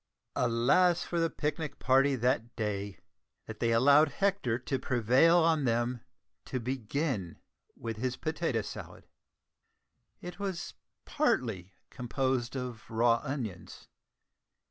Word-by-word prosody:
Alas 125 +9 +3
for 170 - -2
the 165 0 +2
picnic 150 -1 -3
party 135 +2 +3
that 120 -1 0
day, 100 -3 -3 0.5
that 110 -1 -9
they 115 -1 +1
allowed 140 +6 +5
Hector 195 - 0
to 130 +2 -3
prevail 130 +8 +4
on 160 -3 +3
them 120 0 0 0.4
to 130 - -3
begin 125 - -3 0.4
with 115 -2 -5
his 125 +2 -2
potato 155 -8 -1
salad! - - -9 1.1
It 180 +2 -9
was 195 -3 -4 0.3
partly 110 - -1 0.2
composed 130 0 -2
of 125 -4 -6
raw 115 +1 +3
onions. 120 - -6
125 Hz, 115 wpm, -30 LUFS, 115-150 Hz, 1.1 s, allowed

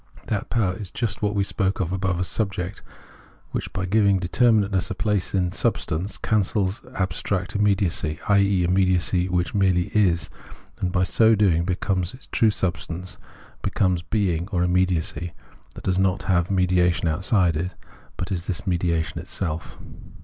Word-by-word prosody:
That 105 -3 -2
power 105 -6 +1
is 95 0 -6
just 105 -1 -3
what 105 0 0
we 100 - +2
spoke 100 +2 -1
of 90 -3 -1
above 95 -2 -1
as 90 - -1
subject, 95 -3 -3 0.7
which - - -4
by 95 - -3
giving 100 0 +3
determinate 105 +3 +2
ness 95 -2 0
a 100 - -3
place 105 -2 -1
in 95 -2 +2
its 90 - -4
substance, 90 +4 -1
cancels 100 +2 0
abstract 95 +2 -2
immediacy, 100 -6 +1
i.e. 100 -2 +3
immediacy 90 0 +2
which 90 0 0
merely 95 -3 +2
is, 90 -6 +2 0.5
and, 90 - -1
by 90 0 +2
so 110 +4 +4
doing, 90 -5 +3
be 90 -1 0
comes 90 -2 -1
the 130 - -11
true 110 - +4
substance, 90 -1 -3 0.4
becomes 90 -3 +1
being 90 -3 -1
or 90 -3 0
immediacy 90 -1 0 0.4
that - - -9
does 95 0 +1
not 95 0 +1
have 90 -2 +1
mediation 90 -2 +2
outside 90 +1 +2
it, 85 +4 -1 0.5
but 90 - -4
is 90 -2 -3
this 90 -1 -3
mediation 85 -3 0
itself. 85 -4 -4
95 Hz, 160 wpm, -24 LUFS, 90-100 Hz, 0.7 s, so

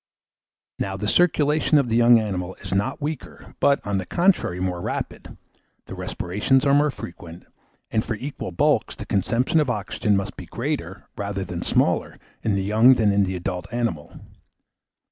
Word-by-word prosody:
Now, 95 0 -2
the 105 - -3
circulation 155 +1 +3
in 140 -3 +2
the 115 - 0
young 120 0 +6
animal 95 -4 -3
is - - -6
not 125 +9 -1
weaker, 150 -2 -6
but, 140 0 +2
on 100 -1 0
the 95 - -5
contrary, 175 - +1
more 90 -1 -2
rapid; - - -5 0.5
the - - -9
respirations 105 +10 0
are 140 - +4
more 145 +1 +4
frequent; 85 - -9 0.5
and, 110 - +1
for 115 - -3
equal 130 -4 -6
bulks, 85 - +1
the - - -8
consumption 115 - +1
of 150 -4 +1
oxygen 105 -1 0
must 100 - -4
be - - -9
greater - - -4
rather 100 -1 -3
than 90 -2 -5
smaller - - +1 0.2
in 105 -3 0
the 95 - 0
young 110 +6 +5
than 110 -4 +3
in 100 0 +3
the 95 0 -3
adult 90 +1 -4
animal. 115 -11 -3
105 Hz, 170 wpm, -23 LUFS, 95-130 Hz, 0.5 s, young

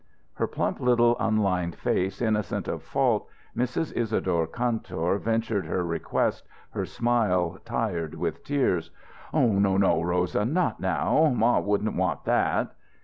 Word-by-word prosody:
Her - - -1
plump - - -2
little 120 -1 +4
unlined 100 -6 +1
face 95 +5 -1
innocent 110 -2 -1
of - - -3
fault, - - 0 0.3
Mrs. 125 +6 -1
Isadore 95 -8 0
Kantor 105 -4 -1
ventured 115 -5 -1
her 90 +2 -1
request, 85 -1 -1 0.2
her - - -2
smile 95 -7 +1
tired 100 -9 -2
with - - -3
tears." 130 - 0 0.4
"No, 105 -5 +3 0.2
no 90 -5 +3
Rosa 90 +3 0
not 165 +11 0
now 95 - +2
ma 120 +1 +3
wouldn't 105 +1 0
want 90 -4 -1
that." - - +1
105 Hz, 130 wpm, -26 LUFS, 90-120 Hz, 0.4 s, little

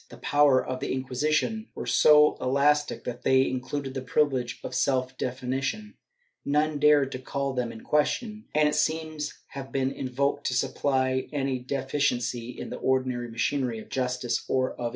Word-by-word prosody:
"^ - - -32
The - - -12
powers 145 -3 +3
of 130 0 -3
the 135 - -3
Inquisition 150 - -1
were - - -5
so 150 0 +6
elastic 145 +3 +2
that 120 0 -5
they 130 0 +4
included 130 +1 -3
the 135 - -3
privilege 130 -2 0
of - - -6
self 130 -1 0
definition; 130 - -3 0.5
none 150 +1 +1
dared 145 -2 +4
to 130 - -5
call 140 +1 -3
them 125 -2 -2
in 110 - -10
question, 210 +9 0
and 150 0 +4
it 150 - 0
seems 155 -1 -1 0.2
have 135 -1 -8
been 135 -1 0
invoked 140 +2 -1
to 125 - -1
supply 130 0 0
any 135 -3 -1
defi 135 +2 -3
ciency 120 -3 -1
in - - -7
the - - -4
ordinary 130 -2 0
machinery 120 +1 -1
of 110 - -10
justice 125 -2 -1
— - - -21
or 130 -1 +1
of - - -11
injustice. 120 -1 -1
135 Hz, 180 wpm, -27 LUFS, 130-145 Hz, 0.5 s, so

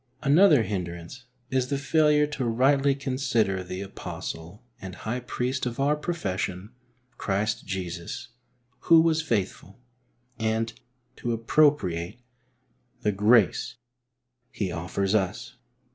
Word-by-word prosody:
Another 150 - +6
hindrance 90 +4 -5 0.3
is 130 -1 +1
the 140 +1 -1
failure 150 +1 +3
to 150 -2 -4
rightly 135 +4 +3
"con 135 -2 -4
sider 110 -8 +1
the 90 +1 -6
Apostle 85 -1 -7 0.2
and 95 -1 -7
High 120 +3 -3
Priest 125 +1 -2
of 120 +2 -5
our 145 +2 +3
profession, 100 - -3 0.5
Christ 105 +2 -1
Jesus, 90 +5 -5 0.5
who 165 -1 +6
was 160 0 +3
faithful,'* 100 -6 -3 0.6
and 110 +1 0 0.4
to 120 - -2
appropriate 115 - +2 0.8
the 105 - +2
grace 105 +1 +3 0.7
He 105 -8 -3
offers 95 +4 -2
us. 95 -4 -1
115 Hz, 115 wpm, -26 LUFS, 95-140 Hz, 0.8 s, Another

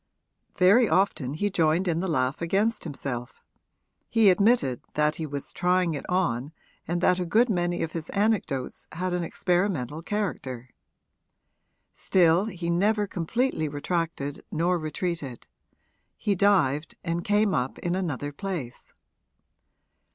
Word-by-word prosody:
Very 200 +6 +5
often 155 -8 +1
he 205 +6 -1
joined 170 +1 +2
in 165 -2 +1
the 190 - -1
laugh 130 -3 0
against 200 +7 0
himself 135 -5 -5 0.7
he 225 -4 +5
admitted 200 - +2
that 150 0 +2
he 160 - -3
was 140 -1 -6
trying 180 -1 +2
it 145 - -6
on 150 -6 0 0.3
and 175 +1 -1
that 180 0 +3
a - - 0
good 235 +7 +3
many 175 -2 0
of 160 - -3
his 165 -1 -5
anecdotes 200 - -1
had 180 +2 -2
an 180 - 0
experimental 170 - -1
character. 140 - -4 1.2
Still 175 +1 +3
he 175 -5 -3
never 205 +4 +2
completely 195 0 -1
retracted 145 -1 -3
nor 175 +2 +1
retreated 155 -4 -4 0.7
he 205 - 0
dived 170 -7 +2
and 170 0 -2
came 205 -1 +2
up 125 -3 -1
in 175 - -2
another 150 -6 -2
place. 150 -7 -5
175 Hz, 130 wpm, -26 LUFS, 150-195 Hz, 1.2 s, Very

